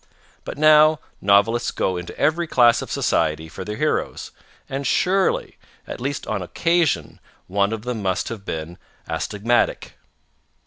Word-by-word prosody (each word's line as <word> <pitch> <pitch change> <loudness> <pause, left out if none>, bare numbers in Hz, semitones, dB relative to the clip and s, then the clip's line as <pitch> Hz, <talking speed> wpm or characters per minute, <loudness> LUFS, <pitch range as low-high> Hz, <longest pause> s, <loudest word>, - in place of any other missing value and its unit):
But - - -6
now 155 0 +6 0.2
novelists 100 +4 +3
go 95 - -1
into 90 0 -7
every 165 +2 +1
class 120 -5 +4
of - - -7
society 80 +1 0
for 85 - -8
their 105 +2 -5
heroes, 155 +4 -2 0.4
and 135 0 -3
surely, 190 +6 +1 0.3
at - - -8
least 135 +2 -3
an 110 -3 -3
occasional 160 - 0 0.3
one 100 +2 0
of 110 -1 -4
them 120 -3 -4
must 95 -2 -1
have 110 -4 -7
been 80 -1 -6 0.3
astigmatic. 115 +4 -1
115 Hz, 140 wpm, -22 LUFS, 95-150 Hz, 0.4 s, now